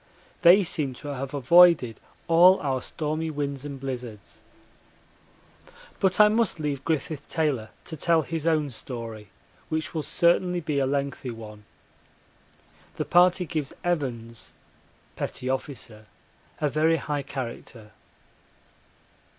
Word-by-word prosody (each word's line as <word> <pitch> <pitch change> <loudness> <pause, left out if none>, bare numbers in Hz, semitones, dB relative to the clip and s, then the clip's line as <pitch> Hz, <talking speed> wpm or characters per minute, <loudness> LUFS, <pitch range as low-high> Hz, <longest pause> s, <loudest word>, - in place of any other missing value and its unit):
They 180 +4 +7
seem 145 -6 -2
to 145 - -8
have 135 -1 -5
avoided 145 -3 +5 0.3
all 175 +3 +6
our 130 -3 -1
stormy 155 +1 -3
winds 140 -3 -3
and 140 -2 -6
blizzards. 125 -7 -7 1.6
But 190 0 +2
I 210 - +9
must 220 -4 +1
leave 145 -3 -3
Griffith 155 -1 -2
Taylor 145 -9 -1 0.2
to 160 - -5
tell 165 +1 +2
his 165 +1 -4
own 155 -3 +1
story, 115 -4 -7 0.4
which 155 0 -3
will 160 - -1
certainly 175 +3 +2
be 155 -4 -2
a 135 - +1
lengthy 140 -1 -2
one. 105 -2 -10 1.3
The - - -3
party 180 +1 +4
gives 150 -3 -4
Evans 120 -9 -3 0.6
[P.O.] 130 +1 -2 1.0
a 150 - +1
very 155 +3 +2
high 145 -1 -3
character. 120 -5 -7
145 Hz, 120 wpm, -26 LUFS, 130-165 Hz, 1.6 s, I